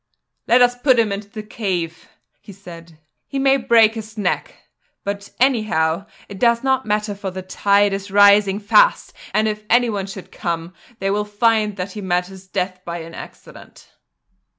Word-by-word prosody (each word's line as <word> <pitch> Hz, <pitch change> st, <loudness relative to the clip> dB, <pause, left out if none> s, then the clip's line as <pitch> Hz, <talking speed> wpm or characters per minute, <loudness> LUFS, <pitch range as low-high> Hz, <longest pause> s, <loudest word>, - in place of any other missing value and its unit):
"Let 245 Hz, +1 st, +5 dB
us 245 Hz, 0 st, +3 dB
put 255 Hz, 0 st, +3 dB
him 225 Hz, -3 st, +2 dB
into 200 Hz, +1 st, -5 dB
the 215 Hz, 0 st, -8 dB
cave," 180 Hz, -7 st, -4 dB, 0.3 s
he -, -, -13 dB
said. 170 Hz, -4 st, -13 dB, 0.3 s
"He 275 Hz, -, -5 dB
may 270 Hz, 0 st, +3 dB
break 230 Hz, -4 st, +4 dB
his 220 Hz, -1 st, -9 dB
neck; 210 Hz, -, -2 dB, 0.5 s
but 200 Hz, 0 st, -5 dB
anyhow 210 Hz, -9 st, +1 dB, 0.2 s
it 200 Hz, -2 st, -10 dB
does 235 Hz, 0 st, +2 dB
not 265 Hz, -2 st, 0 dB
matter 210 Hz, 0 st, -1 dB
for 200 Hz, -1 st, -5 dB
the 185 Hz, 0 st, -7 dB
tide 200 Hz, +1 st, +2 dB
is 195 Hz, +1 st, -5 dB
rising 200 Hz, 0 st, +5 dB
fast 365 Hz, -, +3 dB, 0.2 s
and 215 Hz, +1 st, +1 dB
if 215 Hz, 0 st, -3 dB
anyone 225 Hz, -5 st, +2 dB
should 195 Hz, -1 st, -10 dB
come 170 Hz, 0 st, -4 dB, 0.2 s
they 195 Hz, -1 st, -1 dB
will 210 Hz, +1 st, 0 dB
find 210 Hz, 0 st, +1 dB
that 185 Hz, +1 st, -4 dB
he 210 Hz, -, -7 dB
met 180 Hz, -1 st, 0 dB
his 190 Hz, 0 st, -13 dB
death 185 Hz, -1 st, -3 dB
by 170 Hz, -1 st, -5 dB
an 165 Hz, +1 st, -10 dB
accident." -, -, -13 dB
205 Hz, 175 wpm, -20 LUFS, 190-225 Hz, 0.5 s, Let